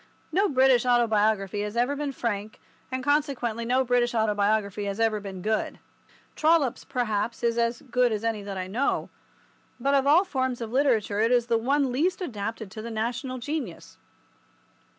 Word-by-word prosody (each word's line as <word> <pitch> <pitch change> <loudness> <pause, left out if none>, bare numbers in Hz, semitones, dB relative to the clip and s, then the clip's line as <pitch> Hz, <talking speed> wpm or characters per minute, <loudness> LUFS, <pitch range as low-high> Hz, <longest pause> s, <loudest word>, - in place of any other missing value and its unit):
No 390 +5 +2
British 260 -3 +4
autobiography 215 -5 +2
has 210 +2 -4
ever 250 +4 +1
been 290 0 -3
frank, 215 -4 -4 0.3
and 260 0 -3
consequently 270 -6 0
no 255 +2 +2
British 240 -1 +1
autobiography 210 -1 +1
has 200 +1 -4
ever 225 -2 +2
been 190 -3 -8
good. 215 0 -1 0.6
Trollope's, 310 -5 +2
perhaps, 230 -3 -2
is 235 -1 +2
as 235 0 0
good 250 -2 +1
as 215 0 -2
any 225 -2 -1
that 200 -1 -6
I 185 - -3
know, 225 +9 -1 0.7
but 275 +3 +1
of 275 0 +3
all 320 +6 +6
forms 260 -8 -2
of 230 -2 -5
literature 235 -6 +1
it 225 +2 +3
is 245 -2 +3
the 230 -1 +1
one 275 +2 +1
least 325 +9 0
adapted 220 - -5
to 215 - -7
the 230 - -6
national 240 +4 -3
genius. 255 - -5
235 Hz, 170 wpm, -26 LUFS, 215-265 Hz, 0.7 s, all